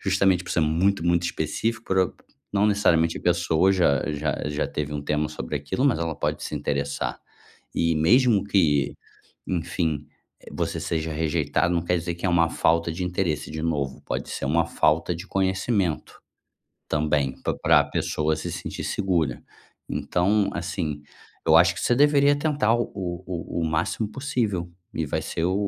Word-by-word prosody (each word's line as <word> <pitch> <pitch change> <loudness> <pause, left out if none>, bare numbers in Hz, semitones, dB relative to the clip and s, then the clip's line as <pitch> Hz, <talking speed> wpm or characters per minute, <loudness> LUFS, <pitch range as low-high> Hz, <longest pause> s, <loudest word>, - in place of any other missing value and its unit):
justamente 95 -2 +2
por - - -7
ser 80 - +2
muito, 85 +4 +1
muito 85 0 +2
específico 100 +7 -2
por 95 - +1
o 95 - +2 0.4
não 100 +1 +3
necessariamente 85 -6 +2
a - - -10
pessoa 85 +1 +3
já 70 -8 +3
já 75 +1 -2
já 75 0 -1
teve 75 0 -3
um 75 - -3
tema 75 +1 0
sobre 75 -1 -4
aquilo, 70 - -2
mas 135 - +3
ela 85 -1 -2
pode - - -2
se - - -4
interessar. 70 -3 -2 0.5
E 85 0 +2
mesmo 110 - +4
que, 80 -9 +2 0.5
enfim, 80 -4 -2 0.3
eh, - - -13
você - - -2
seja 80 -1 -2
rejeitado 80 +1 0
não 85 - +1
quer 90 0 +1
dizer 85 0 -3
que 85 - -5
é 90 - +2
uma 85 -1 +3
falta 85 0 +1
de 90 +3 -4
interesse, 90 -4 -2
de 80 0 -4
novo, 70 -5 -2
pode - - -4
ser - - -4
uma 80 +4 +2
falta 80 +2 +2
de 85 +4 -8
conhecimento, 95 -2 -1 0.7
também, 75 -3 0
pa - - -1
pra - - +5
pessoa 75 0 -1
se - - -5
sentir - - -5
segura. 85 -10 0 0.5
Então, 100 +3 +1
assim. 80 -4 -3 0.4
Eu 80 0 +6
acho 85 +1 +5
que 80 - -6
você 120 - +3
deveria 145 0 +5
tentar 145 -7 +1
o 120 - +1
o 90 -2 -4 0.4
o - - -1
o - - +1
máximo 85 +7 -1
possível, 110 -9 -2 0.2
e 80 - -1
vai - - -1
ser 80 - -3
o 90 +2 +1
85 Hz, 175 wpm, -25 LUFS, 75-95 Hz, 0.7 s, Eu